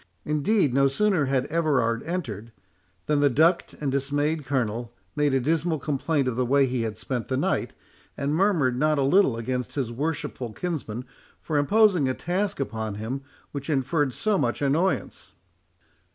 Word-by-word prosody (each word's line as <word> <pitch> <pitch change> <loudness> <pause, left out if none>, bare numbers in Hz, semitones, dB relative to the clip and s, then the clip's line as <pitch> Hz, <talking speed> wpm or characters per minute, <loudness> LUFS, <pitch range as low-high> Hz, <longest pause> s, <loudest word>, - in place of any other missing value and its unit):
Indeed, 150 - +2
no 135 +1 +4
sooner 180 +2 +2
had 130 -1 +1
Everard 135 -9 +1
entered, 115 - -4 0.5
than 150 -1 +1
the 145 0 +4
ducked 165 +7 +2
and 145 -3 -1
dismayed 145 +3 0
Colonel 120 -3 -1 0.2
made 150 -1 +2
a 135 - +2
dismal 160 +4 0
complaint 145 0 -1
of 125 - -1
the 130 - +1
way 135 +3 +3
he 125 -2 -1
had 110 -2 -3
spent 120 +1 -3
the 130 - -1
night, - - -1 0.4
and 140 +1 -1
murmured 160 -9 +2
not 155 +1 +2
a 140 - +2
little 140 -4 +4
against 125 0 -3
his 130 -5 -2
worshipful 135 -3 -3
kinsman 130 -9 -4 0.3
for 155 - -4
imposing 180 -1 +4
a 130 - -1
task 190 +2 -2
upon 110 -6 -3
him 115 +6 -4 0.3
which 140 +1 -6
inferred 145 0 +1
so 205 - 0
much 120 -4 0
annoyance. 155 +7 -1
140 Hz, 165 wpm, -25 LUFS, 125-160 Hz, 0.5 s, no